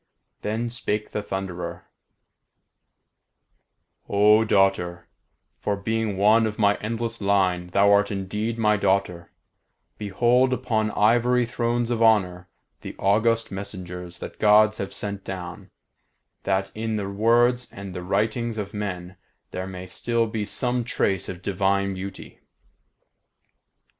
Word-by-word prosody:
Then 115 Hz, +3 st, -2 dB
spake 105 Hz, -3 st, -3 dB
the 105 Hz, -, -2 dB
Thunderer: 90 Hz, -3 st, -5 dB, 2.2 s
"O 105 Hz, +2 st, +5 dB
daughter, 95 Hz, -4 st, +1 dB, 0.5 s
for, 105 Hz, -, -1 dB
being 110 Hz, 0 st, -2 dB
one 110 Hz, +3 st, +4 dB
of 105 Hz, -, -5 dB
my 100 Hz, -2 st, +4 dB
endless 115 Hz, +1 st, -4 dB
line, 95 Hz, -3 st, +1 dB
thou 100 Hz, +3 st, +3 dB
art 100 Hz, 0 st, +4 dB
indeed 105 Hz, +3 st, -3 dB
my 105 Hz, -2 st, +3 dB
daughter, 95 Hz, -3 st, 0 dB, 0.7 s
behold 120 Hz, +5 st, +2 dB
upon 110 Hz, -3 st, 0 dB
ivory 120 Hz, +4 st, +3 dB
thrones 120 Hz, 0 st, -1 dB
of 115 Hz, -1 st, -1 dB
honour 90 Hz, -6 st, +2 dB, 0.3 s
the -, -, -8 dB
august 115 Hz, +3 st, +2 dB
messengers 90 Hz, -3 st, -7 dB
that -, -, -9 dB
Gods 110 Hz, 0 st, +5 dB
have 100 Hz, -, -4 dB
sent 100 Hz, 0 st, -5 dB
down, 90 Hz, -2 st, -7 dB, 0.8 s
that 95 Hz, 0 st, 0 dB
in 110 Hz, 0 st, -3 dB
the 100 Hz, -2 st, -2 dB
words 120 Hz, +4 st, +2 dB
and 95 Hz, -1 st, -8 dB
the 90 Hz, -, -5 dB
writings 110 Hz, +5 st, -1 dB
of 100 Hz, -1 st, -5 dB
men 95 Hz, -3 st, -5 dB, 0.3 s
there 95 Hz, +1 st, -4 dB
may 95 Hz, -1 st, -7 dB
still 115 Hz, +4 st, -1 dB
be 110 Hz, -1 st, -3 dB
some 125 Hz, +2 st, -1 dB
trace 95 Hz, -5 st, -1 dB
of 90 Hz, 0 st, -7 dB
divine 100 Hz, 0 st, 0 dB
beauty. 95 Hz, +1 st, -8 dB
105 Hz, 125 wpm, -24 LUFS, 95-115 Hz, 2.2 s, O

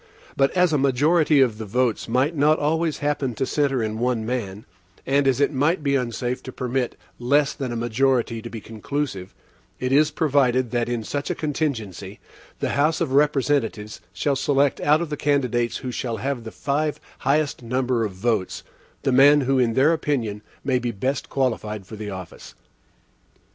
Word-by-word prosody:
But 135 Hz, 0 st, +3 dB
as 180 Hz, -3 st, +4 dB
a 150 Hz, -, +2 dB
majority 145 Hz, +3 st, +3 dB
of 115 Hz, -5 st, +2 dB
the 110 Hz, -, -4 dB
votes 125 Hz, +2 st, 0 dB
might 130 Hz, +7 st, +1 dB
not 150 Hz, +2 st, +4 dB
always 160 Hz, +1 st, 0 dB
happen 140 Hz, -4 st, -1 dB
to 135 Hz, -, -1 dB
centre 135 Hz, -4 st, 0 dB
in 110 Hz, 0 st, -3 dB
one 120 Hz, -2 st, 0 dB
man, 110 Hz, -4 st, -4 dB, 0.4 s
and 140 Hz, +1 st, +2 dB
as 135 Hz, -1 st, +2 dB
it 145 Hz, +1 st, +2 dB
might 150 Hz, +4 st, +1 dB
be 140 Hz, -1 st, +2 dB
unsafe 125 Hz, 0 st, -2 dB
to 130 Hz, -, -8 dB
permit 125 Hz, 0 st, -2 dB, 0.2 s
less 140 Hz, +4 st, +2 dB
than 130 Hz, -3 st, -4 dB
a -, -, -3 dB
majority 120 Hz, 0 st, 0 dB
to 115 Hz, -, -7 dB
be 115 Hz, -, -7 dB
conclusive, 110 Hz, -3 st, -4 dB, 0.4 s
it 130 Hz, 0 st, -2 dB
is 150 Hz, +2 st, +4 dB
provided 130 Hz, -6 st, +1 dB
that, 120 Hz, -1 st, 0 dB
in 120 Hz, -2 st, -2 dB
such 145 Hz, +6 st, -4 dB
a 180 Hz, -, -1 dB
contingency, 115 Hz, -, -3 dB, 0.4 s
the -, -, 0 dB
House 155 Hz, +3 st, +1 dB
of 160 Hz, -6 st, -1 dB
Representatives 135 Hz, -7 st, +1 dB
shall 145 Hz, -2 st, 0 dB
select 140 Hz, +1 st, +1 dB
out 150 Hz, +2 st, +3 dB
of 160 Hz, -, -7 dB
the 150 Hz, -, -2 dB
candidates 125 Hz, -5 st, 0 dB
who 125 Hz, -, -2 dB
shall 120 Hz, -2 st, -3 dB
have 125 Hz, +1 st, -3 dB
the 110 Hz, -, -6 dB
five 150 Hz, +2 st, -1 dB, 0.2 s
highest 145 Hz, +1 st, 0 dB
number 125 Hz, 0 st, 0 dB
of 105 Hz, -3 st, -3 dB
votes, 100 Hz, -1 st, -1 dB, 0.4 s
the 135 Hz, -, +1 dB
man 140 Hz, +3 st, +6 dB
who 135 Hz, 0 st, +1 dB
in 115 Hz, -3 st, +2 dB
their 145 Hz, +5 st, +4 dB
opinion 120 Hz, -10 st, -2 dB, 0.2 s
may 130 Hz, -2 st, +1 dB
be 120 Hz, 0 st, -2 dB
best 130 Hz, +6 st, -2 dB
qualified 110 Hz, -6 st, -2 dB
for 110 Hz, -, -9 dB
the 105 Hz, -1 st, -6 dB
office. 95 Hz, -3 st, -9 dB
130 Hz, 180 wpm, -23 LUFS, 115-145 Hz, 0.4 s, man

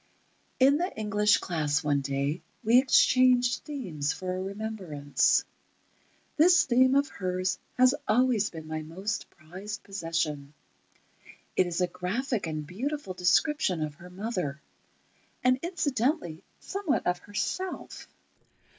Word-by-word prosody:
In 275 Hz, +2 st, +5 dB
the 355 Hz, +4 st, -1 dB
English 210 Hz, -1 st, +3 dB
class 155 Hz, -2 st, -1 dB
one 145 Hz, -1 st, +1 dB
day, 140 Hz, +4 st, -2 dB, 0.2 s
we 235 Hz, +3 st, +6 dB
exchanged 255 Hz, -1 st, +4 dB
themes 175 Hz, -, -3 dB
for 185 Hz, -1 st, -4 dB
a 185 Hz, -, -3 dB
remembrance. 190 Hz, -8 st, 0 dB, 0.9 s
This 345 Hz, +3 st, +6 dB
theme 260 Hz, +1 st, +4 dB
of 280 Hz, +1 st, +3 dB
hers 185 Hz, 0 st, -2 dB, 0.2 s
has 255 Hz, +1 st, +6 dB
always 235 Hz, -3 st, +3 dB
been 160 Hz, -2 st, -9 dB
my 155 Hz, 0 st, -4 dB
most 190 Hz, +7 st, -4 dB
prized 190 Hz, +6 st, -8 dB
possession. 165 Hz, -6 st, -3 dB, 1.0 s
It 185 Hz, -, +3 dB
is 175 Hz, +1 st, -2 dB
a 180 Hz, -, +3 dB
graphic 195 Hz, +5 st, -2 dB
and 155 Hz, -1 st, -4 dB
beautiful 245 Hz, -, -4 dB
description 180 Hz, -, +2 dB
of 150 Hz, -1 st, -4 dB
her 175 Hz, +5 st, -13 dB
mother, 180 Hz, -7 st, -3 dB, 0.8 s
and 255 Hz, 0 st, +3 dB
incidentally 285 Hz, -, -1 dB, 0.2 s
somewhat 390 Hz, -7 st, -2 dB
of 180 Hz, 0 st, +1 dB
herself. 290 Hz, -, -4 dB
195 Hz, 120 wpm, -28 LUFS, 165-255 Hz, 1.0 s, we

